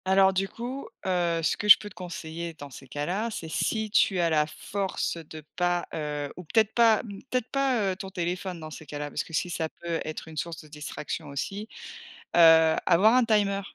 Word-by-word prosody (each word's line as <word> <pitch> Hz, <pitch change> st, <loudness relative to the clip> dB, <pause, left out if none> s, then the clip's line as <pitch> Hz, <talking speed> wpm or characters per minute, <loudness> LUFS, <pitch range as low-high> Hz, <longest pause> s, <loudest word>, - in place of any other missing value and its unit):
Alors 190 Hz, 0 st, +5 dB
du 195 Hz, +1 st, 0 dB
coup, 255 Hz, +4 st, -6 dB, 0.2 s
heu, 175 Hz, -3 st, +1 dB
ce -, -, +2 dB
que 210 Hz, -, -3 dB
je -, -, +12 dB
peux 210 Hz, -, -9 dB
te 205 Hz, -, -11 dB
conseiller 170 Hz, -2 st, -6 dB
dans 145 Hz, -2 st, -10 dB
ces 130 Hz, +2 st, -11 dB
cas-là, 180 Hz, -, -2 dB
c'est 170 Hz, -7 st, -6 dB
si 220 Hz, +5 st, -1 dB
tu 195 Hz, -3 st, +3 dB
as 170 Hz, -1 st, +2 dB
la 150 Hz, -1 st, +3 dB
force 195 Hz, +3 st, -3 dB
de 155 Hz, -1 st, -9 dB
pas, 175 Hz, -1 st, +1 dB
heu 150 Hz, -2 st, -3 dB
ou 180 Hz, -, -7 dB
peut-être 220 Hz, +5 st, +2 dB
pas 230 Hz, -2 st, +5 dB, 0.3 s
peut-être 250 Hz, -2 st, -1 dB
pas, 275 Hz, -3 st, +1 dB
heu, -, -, -3 dB
ton 190 Hz, 0 st, -7 dB
téléphone 180 Hz, 0 st, -3 dB
dans 155 Hz, -1 st, -8 dB
ces 155 Hz, 0 st, -10 dB
cas-là, 145 Hz, 0 st, -5 dB
parce -, -, -2 dB
que -, -, -15 dB
si 175 Hz, +3 st, -1 dB
ça 160 Hz, -1 st, -2 dB
peut 170 Hz, 0 st, -4 dB
être 155 Hz, +1 st, -6 dB
une 160 Hz, -1 st, -10 dB
source 165 Hz, 0 st, -4 dB
de -, -, -15 dB
distraction 150 Hz, +1 st, -6 dB
aussi, 195 Hz, +10 st, -4 dB, 0.7 s
heu, 160 Hz, -1 st, +7 dB
avoir 190 Hz, +6 st, +5 dB
un 255 Hz, 0 st, +5 dB
timer. 205 Hz, -3 st, +2 dB
175 Hz, 210 wpm, -27 LUFS, 160-205 Hz, 0.7 s, je